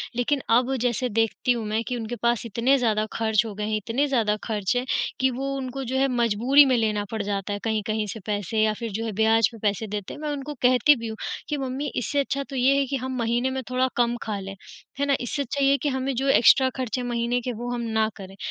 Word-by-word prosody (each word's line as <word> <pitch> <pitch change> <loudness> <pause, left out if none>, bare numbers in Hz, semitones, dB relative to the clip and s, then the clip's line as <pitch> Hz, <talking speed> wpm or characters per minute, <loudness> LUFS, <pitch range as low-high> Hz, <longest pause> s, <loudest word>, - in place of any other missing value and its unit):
लेक़िन 265 +4 0 0.2
अब 255 +2 +1
जैसे 245 +1 0
देखती 225 +2 +1
हूँ 235 -3 -1
मैं 220 +2 -1
कि 250 - -2
उनके 230 +1 -4
पास 235 -1 +1
इतने 235 +5 +2
ज़्यादा 215 -4 +1
ख़र्च 220 0 +1
हो 220 - -5
गए 210 +1 -3
हैं, 215 - +1
इतने 235 +7 -1
ज़्यादा 225 -6 +1
ख़र्च 210 -1 -1
हैं 245 +1 0 0.3
कि 265 - +3
वो 270 +2 -3
उनको 265 0 -4
जो 260 +1 -2
है 270 +1 +3
मजबूरी 245 +3 +4
में 260 -2 +3
लेना 215 -2 0
पड़ 220 -1 -2
जाता 200 0 -2
है 205 - -3
कहीं-कहीं 215 -1 -1
से 225 - -8
पैसे 210 +1 -1
या 215 0 +2
फ़िर 230 -2 -4
जो 225 +3 -3
है 225 - -2
ब्याज 220 0 +4
पे 230 - -11
पैसे 205 +2 -1
देते 205 -1 -5
हैं। - - -10
मैं 305 - -3
उनको 290 +1 -5
कहती 255 +4 +5
भी 230 -3 -6
हूँ 220 0 -6 0.3
कि 295 - -1
मम्मी 270 +1 -3
इससे 265 +4 -1
अच्छा 280 0 -1
तो 275 - -6
ये 260 +2 +4
है 280 - +1
कि 275 - -2
हम 260 -1 -3
महीने 240 +2 0
में 265 0 -3
थोड़ा 255 +1 +1
कम 240 0 +2
ख़ा 215 -2 -3
लें 195 0 -7 0.5
है 285 - +2
ना, 280 -1 +3
इससे 265 +4 -2
अच्छा 280 +1 -2
ये 275 - +5
है 280 - +4
कि 295 - +1
हमें 265 0 -1
जो 270 +3 -1
एक्स्ट्रा 260 0 +6
ख़र्चे 255 -1 -2
महीने 240 0 0
के 250 - -3
वो 240 +2 -5
हम 245 -1 -2
ना 220 0 +3
करें। 195 -1 -10
240 Hz, 255 wpm, -25 LUFS, 220-265 Hz, 0.5 s, एक्स्ट्रा